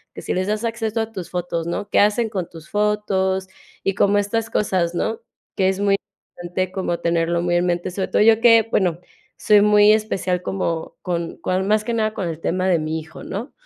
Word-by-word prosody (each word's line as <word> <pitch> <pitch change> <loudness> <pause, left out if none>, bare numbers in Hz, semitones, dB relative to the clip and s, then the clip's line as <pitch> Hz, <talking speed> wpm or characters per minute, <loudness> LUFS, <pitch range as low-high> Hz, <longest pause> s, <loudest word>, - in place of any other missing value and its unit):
que - - -7
si - - -3
les 185 +1 -1
das 215 +2 -1
acceso 225 -1 -2
a 225 0 -4
tus 185 -5 -7
fotos, 170 -2 -3
¿no? 205 +4 -3
¿Qué - - +3
hacen 210 +2 +3
con 185 -5 -4
tus 165 -1 -13
fotos? 195 -2 0 0.4
Y 195 - +1
como 205 0 +3
estas 225 +2 -1
cosas, 180 -4 0
¿no? 225 +5 -2 0.3
Que 190 -1 +2
es 190 0 -2
muy 200 -1 +3 0.4
importante 180 +1 -3
como 185 -3 -2
tenerlo 170 0 0
muy 175 0 +1
en 175 +1 +2
mente. 175 +1 -1
Sobre 190 +1 -2
todo - - +2
yo 225 0 +5
que, 230 -2 +6
bueno, 175 -3 +1 0.4
soy 210 -2 +5
muy 210 0 +6
especial 190 -4 -1
como 170 -4 -3
con 170 -2 -3
con 185 +3 -1
más 215 0 +2
que 235 - -2
nada 215 -1 0
con 185 - -2
el 165 -1 -5
tema 185 +2 0
de 175 -3 +3
mi 155 +1 -2
hijo, 160 +1 -11
¿no? 230 +8 -6
190 Hz, 215 wpm, -21 LUFS, 175-210 Hz, 0.4 s, que